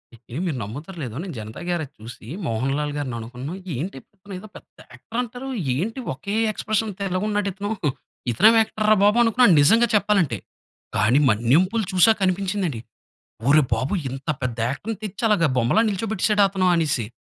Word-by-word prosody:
ఎండి 120 +4 -8
మీరు 150 - -2
నమ్ముతారో 150 - -8
లేదో 120 -3 -6
నిను 180 -5 -6
'జనతా 110 0 -8
గ్యారేజ్' 170 -6 -2
చూసి, 115 0 -11 0.2
'మోహన్ 125 +4 -1
లాల్' 150 -1 -2
గారిని 130 -5 -3
అనుకున్నాను 125 +7 -7 0.2
ఏంటి? 145 +3 -4 0.2
ఇతనిదో 195 +1 -9
పెద్ద - - -16 0.2
యాక్టర్ 230 - -6
అంటారు. 250 +3 -6 0.3
ఏంటి 220 - -2
ఒకే 200 +10 -5 0.2
ఎక్స్ప్రెషన్‌తో 215 -2 -2
ఇలాగున్నాడు 205 +2 -1
ఇతను. 205 +3 -4 0.6
ఇతనేం 215 - +6
యాక్టర్ 215 -1 -2
రా 215 - +7
బాబు 210 +3 +4
అనుకున్నా 240 +2 +4
నిజంగా 230 +11 +5
చెప్పాలంటే. 195 - +2 0.6
కానీ 115 +8 +4
'మన్యం 120 - +4
పులి' 220 -5 0
చూసక 190 +5 +5
కనిపించింది 190 +1 0
అండి. 115 -6 -6 0.7
ఒరీ 150 +1 +6
బాబోయి! 140 - -1
ఇంత 135 +3 -8
పెద్ద 125 -2 -3
యాక్టర్‌ని 200 - -4
తెచ్చి 210 +3 -5
అలగా 170 -7 +3
బొమ్మలా 125 - +3
నిల్చోబెట్టేసాడ 210 +1 0
అతను 185 -1 +1
అనేసి. 145 -9 0
180 Hz, 160 wpm, -23 LUFS, 130-210 Hz, 0.7 s, రా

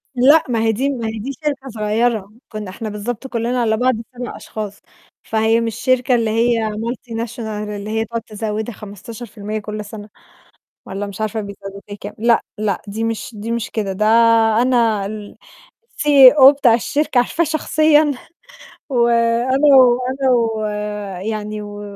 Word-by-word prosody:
لأ، 280 +6 +5
ما 235 -2 0
هي 225 - +3
دي 260 +6 -1
ما 240 -5 -3
هي 220 0 -4
دي 255 +6 -4
شركة 275 -3 -3
صغيرة، 215 -1 -1 0.2
كُنّا 215 -3 -6
إحنا 215 +4 -6
بالضبط 220 +5 -5
كُلّنا 240 0 -1
على 220 -2 +1
بعض 255 +2 +2 0.2
7 245 0 -5
أشخاص، 210 -2 -7 0.4
فهي 225 +1 +1
مش 225 -2 -2
شركة 255 +1 +2
اللي 230 -2 0
هي 230 0 +1
multinational 230 +1 -5
اللي 210 -1 -5
هي 220 +1 -1
تقعُد 230 +1 -4
تزودِك 215 +1 -4
15% 215 +1 -7
كل 210 0 -6
سَنة 210 0 -10 0.8
والّا 195 +2 -4
مش 200 0 -9
عارفة 220 +1 -2
بيزوّدوا 200 -1 -8 0.2
كام. - - -7
لأ، 235 +1 +3 0.2
لأ، 210 -3 -1
دي 215 +3 -4
مش 225 +1 -3
دي 215 +2 -5
مش 235 -1 -3
كده، 205 -3 -2
ده 215 +3 0 0.6
أنا 230 -5 +2
الCEO 270 - +3
بتاع 270 -5 +3
الشركة 280 +3 0
عارفاه 280 +7 +1
شخصيًا 310 -1 +3 0.8
وأنا 240 +3 +3
و 250 -2 +6
أنا 265 0 0
و 225 -2 +1 0.7
يعني 215 -1 -4
و 205 0 -8
225 Hz, 150 wpm, -19 LUFS, 210-250 Hz, 0.8 s, و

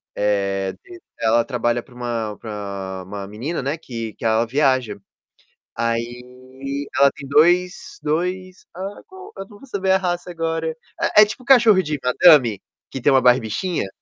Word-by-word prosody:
eh, 100 -2 0
e 360 -2 -12 0.2
ela 115 +1 +3
trabalha 120 -1 -1
pra 130 - -20
uma 115 -4 -4
pra 100 -3 -6
uma 100 +1 -7
menina, 120 +12 -4
né, 140 +4 -2
que 115 -8 -6
que - - -8
ela 110 +1 +2
viaja. 130 -2 +1 0.8
Aí 125 +4 -4
ela 140 0 +6
tem 140 - -10
dois-dois 180 - 0
ah, 195 +2 -6
qual? 380 +2 -12
Eu 195 - -7
não 205 - -15
vou 275 - -15
saber 195 -5 -2
a 190 - +4
raça 180 -1 -3
agora. 165 -1 -3 0.4
É - - +11
é - - +6
tipo 250 +5 -8
cachorro 230 -7 +6
de 150 -3 -3
madame, 125 - +5 0.3
que 135 - -6
tem 140 - +3
uma 135 - +5
barbichinha? 125 - +1
135 Hz, 160 wpm, -21 LUFS, 115-180 Hz, 0.8 s, É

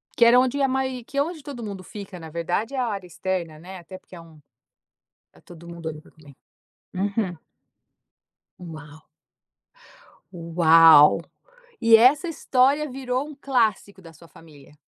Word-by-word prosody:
Que 235 - +4
era 240 +2 +6
onde 260 +2 0
a 270 - +3
mai 260 -1 -3
que 280 - -9
é 280 - +3
onde 325 -1 -8
todo 275 -5 -8
mundo 200 -3 -7
fica. 195 -2 -10
Na 160 -1 -10
verdade, 175 - -3
é - - -4
a 250 - 0
área 200 -4 -5
externa, 175 -3 -5
né. 185 +3 -11
Até 185 +2 -12
porque 185 - -17
é 170 - -11
um 160 -2 -18 0.9
tá - - -22
todo 170 -1 -15
mundo 170 -1 -7
ali 155 -1 -8
pra - - -21
comer. 145 -3 -19 0.6
Uhum. 195 -2 -2 1.2
Uau! 155 -3 -11 1.3
Uau. 165 -3 +5 0.6
E 230 0 +6
essa 270 +9 +4
história, 285 -1 +1
virou 255 +1 -3
um 305 - -10
clássico 225 -8 -1
da 165 -2 -14
sua 165 +2 -18
família? 150 -3 -18
190 Hz, 160 wpm, -23 LUFS, 165-255 Hz, 1.3 s, era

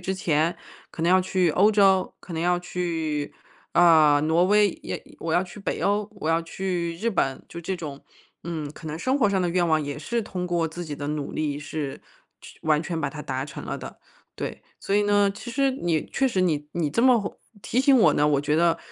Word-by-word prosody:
之 190 +1 -2
前 165 -2 +1 0.3
可 160 - -6
能 170 - +3
要 185 - +6
去 185 -2 +1
欧 200 +7 +4
洲、 195 -3 +3
可 180 - -11
能 160 - -3
要 175 +1 +2
去， 165 -4 -3 0.4
呃， 155 -4 +6
挪 160 +3 +3
威， 205 +1 +4
也 - - -5 0.2
我 165 -1 -1
要 175 - +3
去 190 +3 -11
北 - - -3
欧、 205 +1 +1
我 165 -5 -2
要 165 - +2
去 170 0 -3
日 230 +7 -1
本。” 135 -9 -1
就 170 - -7
这 185 +3 -3
种。 145 -5 -7 0.5
嗯， 155 -4 -4
可 160 - -11
能 155 - -4
生 260 +8 0
活 215 - +4
上 190 -2 +1
的 175 - +1
愿 175 0 +2
望 155 -1 +2
也 145 +1 -5
是 230 +10 -2
通 180 -3 -4
过 170 -2 0
自 175 +2 -7
己 150 - -4
的 145 0 -4
努 150 -1 -3
力 150 -2 -2
是 145 -2 -5 0.4
去 - - -14
完 155 -1 +3
全 170 -1 -3
把 140 -3 -2
它 150 - -8
达 130 -2 -3
成 150 - -8
了 - - -4
的， - - -9 0.4
对。 - - -5 0.2
所 195 - -1
以 210 - +4
呢， 205 0 +3
其 240 +3 -8
实 275 +2 +2
你 170 - -1
确 270 - +2
实 195 -7 0
你 150 -5 0
你 165 -3 0
这 155 +11 0
么 250 -3 +5
会 200 - -3 0.3
提 240 - -2
醒 275 0 +5
我 155 -9 +5
呢， 150 0 +3
我 145 -2 +2
觉 150 +1 0
得， 170 0 +3
170 Hz, 245 characters per minute, -25 LUFS, 155-195 Hz, 0.5 s, 要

